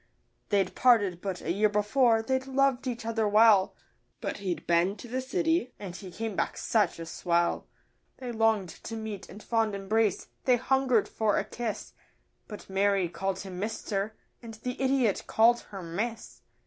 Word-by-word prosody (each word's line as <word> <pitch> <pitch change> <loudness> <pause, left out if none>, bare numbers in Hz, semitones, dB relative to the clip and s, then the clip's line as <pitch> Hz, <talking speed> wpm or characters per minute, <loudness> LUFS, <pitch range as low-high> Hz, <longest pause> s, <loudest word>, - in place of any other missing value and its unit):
They'd 195 -3 +1
parted 205 -8 +3
but 190 -3 -4
a 165 - -2
year 210 +4 +3
before; 225 +2 +3
they'd 260 +2 -1
loved 270 -1 +1
each 240 -2 -4
other 225 -1 0
well, 210 -2 +5 0.4
But - - -4
he'd 190 -4 -4
been 175 +3 +2
to 240 - -10
the 255 +2 -2
city, 325 -1 0
and 190 -4 -7
he 190 -1 -8
came 220 +2 -4
back - - -1
such 210 -6 +1
a 165 - -6
swell. 170 +1 0 0.5
They 250 -2 -5
longed 220 -5 +2 0.2
to 225 - -5
meet 215 -3 -6
in 210 - -11
fond 225 -3 0
embrace, 205 +1 0 0.2
they 250 -2 +5
hungered 260 -3 +2
for 215 -2 0
a - - +1
kiss 235 -3 -5 0.5
But 210 - -9
Mary 195 -2 +1
called 190 +2 -3
him 185 -2 -7
'Mister,' 210 0 -3 0.3
and 230 -2 -9
the 250 0 -4
idiot 260 -6 +1
called 235 +2 +4
her 195 -3 -7
'Miss. 220 +7 -5
220 Hz, 170 wpm, -28 LUFS, 195-240 Hz, 0.5 s, well